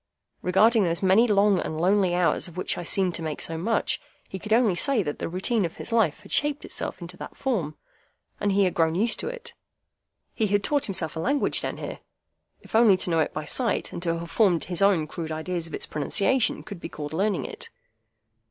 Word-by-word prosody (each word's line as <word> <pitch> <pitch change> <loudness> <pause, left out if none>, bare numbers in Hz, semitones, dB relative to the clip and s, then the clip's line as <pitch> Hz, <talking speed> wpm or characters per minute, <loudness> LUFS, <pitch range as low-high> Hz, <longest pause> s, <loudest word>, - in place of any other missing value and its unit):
Regarding 215 +5 +4
those 170 +1 -1
many 195 +6 +5
long 200 -2 +3
and 155 - -4
lonely 185 0 +2
hours 175 0 +1
of 175 0 -13
which 185 - -1
I - - -5
seemed 185 +1 +1
to 170 - -5
make 155 -2 -4
so 165 - -3
much, 210 +8 -1 0.3
he 190 - -7
could 210 +3 -9
only 225 -3 +4
say 220 +5 +2
that 145 -3 -4
the - - -3
routine 190 +5 0
of 170 - -3
his - - -7
life 220 -10 +2
had - - -15
shaped 295 0 0
itself - - -5
into 175 +1 -8
that - - -9
form, 190 - -2 0.6
and 205 - +1
he 200 +1 +3
had 185 - +1
grown 165 -1 +1
used 225 +5 0
to - - -4
it. - - -8 0.8
He 220 - 0
had 205 0 +1
taught 290 -2 +1
himself 175 -6 -3
a - - -4
language 280 - +2
down - - -4
here,—if - - -12
only 220 -4 +6
to 180 - +2
know 165 - +2
it 155 - +1
by 155 - -5
sight, 245 +6 0
and - - -5
to 165 -1 0
have 170 0 -7
formed 190 -7 +3
his 175 0 -2
own 195 -6 +4
crude 160 +1 -6
ideas 165 +2 -3
of 160 - -13
its - - -3
pronunciation, 215 - 0
could 200 -4 -9
be 165 - -7
called 150 -1 -7
learning 195 +3 0
it. - - -8
185 Hz, 220 wpm, -25 LUFS, 165-215 Hz, 0.8 s, only